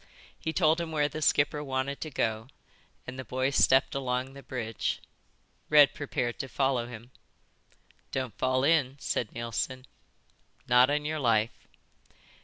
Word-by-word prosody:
He 160 - -2
told 160 0 +3
him 165 -1 -4
where 150 -2 +2
the 155 +2 -6
skipper 145 0 +2
wanted 135 0 -2
to 155 - -4
go, 110 -4 -1 0.6
and 130 +1 -7
the - - -4
boy 130 +1 -1
stepped 130 -1 +4
along 130 0 -2
the 140 - -10
bridge. 115 -5 -3 0.7
Red 150 -2 +7
prepared 120 -5 -3
to 135 - -3
follow 130 -3 0
him. 120 +1 -10 1.0
"Don't 130 -3 -3
fall 130 0 +1
in," 140 -3 +2
said 115 - -2
Neilson. 120 +2 -3 0.8
"Not 125 +2 +6
on 150 0 0
your 155 +1 -2
life." 115 -4 0
130 Hz, 145 wpm, -29 LUFS, 125-145 Hz, 1.0 s, Red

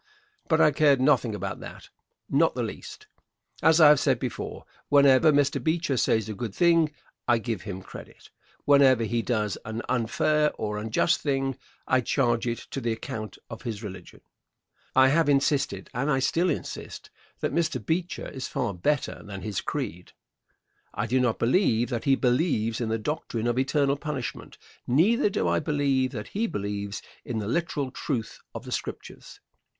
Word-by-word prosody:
But - - +2
I 150 - +6
cared 145 -1 +4
nothing 130 -5 +2
about 100 -1 -4
that, - - -10 0.4
not - - +2
the - - -1
least. - - -8 0.6
As 160 +1 +5
I 155 -2 +9
have 150 -2 +6
said 135 -3 +2
before, 125 0 -5 0.2
whenever 140 +1 +6
Mr. 145 -1 +1
Beecher 160 -3 0
says 110 -3 +1
a 110 - -4
good 110 -1 -5
thing 165 -3 +4 0.4
I 120 - +4
give 115 -3 -3
him 95 0 -7
credit. - - -12 0.3
Whenever 135 -4 +5
he 115 +1 0
does 105 -4 -1
an 110 +2 -5
unfair 150 +5 +1
or 105 -1 -3
unjust 110 +1 +1
thing 135 -2 -1 0.3
I 130 0 +3
charge 120 -1 +1
it 120 0 -1
to 135 - -4
the 115 -1 -1
account 110 -1 -5
of 110 - -9
his 115 -3 -5
religion. 95 -3 -9 0.7
I 130 0 +6
have 155 +1 +3
insisted, 135 -8 +1
and 130 +4 -1
I 135 - +3
still 170 +7 +1
insist, 155 - -5 0.3
that - - -1
Mr. 160 -5 +1
Beecher 175 +2 -2
is 130 -2 -6
far 100 - -2
better 130 +11 -1
than 100 -2 -8
his 105 -3 -3
creed. 90 +2 -5 0.8
I - - -1
do 125 +4 +1
not 125 -3 +1
believe 120 - +2
that 120 -3 -3
he 135 -1 +5
believes 125 -4 +1
in 115 - -1
the 110 - 0
doctrine 115 -2 -3
of 120 +1 +1
eternal 140 +1 +1
punishment. 145 -4 -5 0.3
Neither 205 - +3
do 95 - -1
I 85 0 +2
believe 140 - +1
that 105 -4 -6
he 225 +3 -1
believes 100 - -4 0.2
in 120 - -4
the 105 -2 -3
literal 145 -1 -1
truth 125 -5 -4 0.2
of - - -6
the - - -8
Scriptures. - - -6
130 Hz, 170 wpm, -26 LUFS, 110-145 Hz, 0.8 s, I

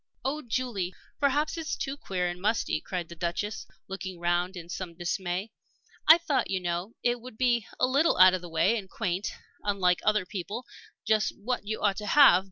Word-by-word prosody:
"Oh, 295 +3 -1
Julie, 225 -8 -2 0.2
perhaps 295 +3 +1
it's 320 - -2
too 270 0 -3
queer 185 -9 -2
and 175 0 -5
musty!" 210 -6 0
cried 180 -3 -4
the 170 - -9
Duchess, 175 +6 -3 0.2
looking 190 -2 -6
round 175 +2 0
her 175 - -5
in 165 - -15
some 175 -1 -6
dismay. 180 +3 -2 0.6
"I 320 - +10
thought, 295 -7 0
you 190 - 0
know, 175 +4 -3
it 240 0 +1
would 245 -2 -11
be 240 -3 +2
a - - +5
little 280 +6 +3
out 185 0 +8
of 185 - -1
the 175 - -9
way 190 +7 +3
and 190 -2 -11
quaint 190 -2 -2 0.3
unlike 190 -3 +2
other 215 -3 +2
people 205 +6 -5 0.4
just 215 0 +1
what 210 0 -3
you 220 0 -3
ought 200 -2 +2
to 210 - -5
have. 270 -8 +7
200 Hz, 195 wpm, -28 LUFS, 180-245 Hz, 0.6 s, I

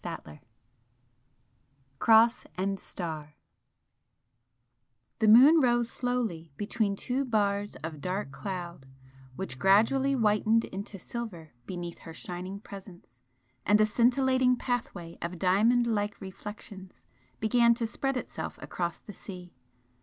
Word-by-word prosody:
XIV 75 -1 -7 1.6
CROSS 230 +4 +5
AND 195 +1 -1
STAR 155 -5 -6 1.8
The 220 - +3
moon 270 +9 +8
rose 240 -2 +2
slowly 225 - -2
between 205 -1 -1
two 255 +6 -1
bars 205 -4 0
of 155 -3 -6
dark 185 -3 -3
cloud 175 -3 -6 0.5
which 135 -8 -5
gradually 230 +8 +4
whitened 220 -1 +2
into 195 +1 -7
silver 185 - -7
beneath 175 -2 -6
her 165 - -11
shining 185 +4 -6
presence, 185 - -12 0.4
and 210 +1 +4
a 215 - +6
scintillating 255 +3 +3
pathway 210 -10 -4
of 175 +1 -4
diamond 215 +7 +3
like 210 -3 -1
reflections 190 0 -10 0.4
began 235 +2 +4
to 230 - -2
spread 270 +4 -2
itself - - -6
across 175 -1 -4
the 205 - -11
sea. 180 -3 -10
205 Hz, 115 wpm, -29 LUFS, 180-235 Hz, 1.8 s, moon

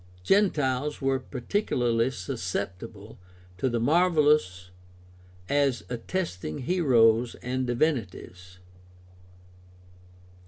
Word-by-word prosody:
Gentiles 150 - +1
were 135 -1 0
particularly 125 - -1
susceptible 105 -4 -6 0.4
to 130 - +1
the 120 -1 -1
marvelous 150 - +2 0.8
as 140 -4 +1
attesting 120 - -4
heroes 120 -8 +3
and 130 +1 -2
divinities. 105 - -2
125 Hz, 70 wpm, -27 LUFS, 110-150 Hz, 0.8 s, heroes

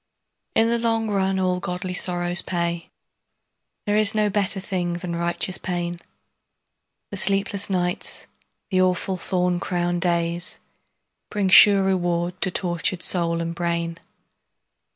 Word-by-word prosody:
In 225 - +4
the 235 0 +1
long 225 -2 0
run 190 -1 +1
all 185 -1 0
godly 180 +1 -4
sorrow 175 -1 -1
pays, 170 -1 -2 1.0
There 205 -1 0
is 215 0 +3
no 210 -1 +2
better 200 -1 0
thing 180 -2 -3
than 175 0 -5
righteous 170 +2 0
pain, 175 -1 -3 1.1
The 200 - -3
sleepless 195 +1 +1
nights, 180 -2 -1 0.5
the 185 -1 +3
awful 185 +1 0
thorn 180 0 -1
crowned 175 -1 -2
days, 170 0 -1 0.7
Bring 200 -2 -1
sure 200 +1 +8
reward 175 -1 -1
to 190 - +3
tortured 175 0 0
soul 170 -2 +1
and 170 0 -3
brain. 170 -1 -2
180 Hz, 130 wpm, -23 LUFS, 175-195 Hz, 1.1 s, sure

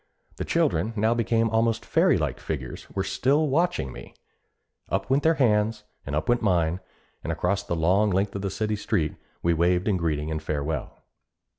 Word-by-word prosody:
The - - -3
children, 90 +8 +1
now 110 +2 +2
become 115 -1 +1
almost 115 0 +1
fairy - - +3
like - - -2
figures, 65 -6 -6
were 95 - -2
still 135 +10 +1
watching 160 - 0
me. - - -11 0.7
Up - - -2
went 135 +2 +4
their 160 +2 +3
hands 105 -4 +2 0.2
and 70 - -2
up 75 - -1
went 120 0 +2
mine, 90 -4 +1 0.4
and 80 - -2
across 90 +4 0
the 85 - -3
long 95 +6 +3
length 100 +1 0
of 100 -1 -2
city 110 +1 -1
street, 100 -7 0 0.3
we 85 - +3
waved 90 +3 +2
in 100 -3 +2
greeting 80 -2 -1
and 80 0 -2
farewell. 75 -2 -4
100 Hz, 175 wpm, -26 LUFS, 80-115 Hz, 0.7 s, went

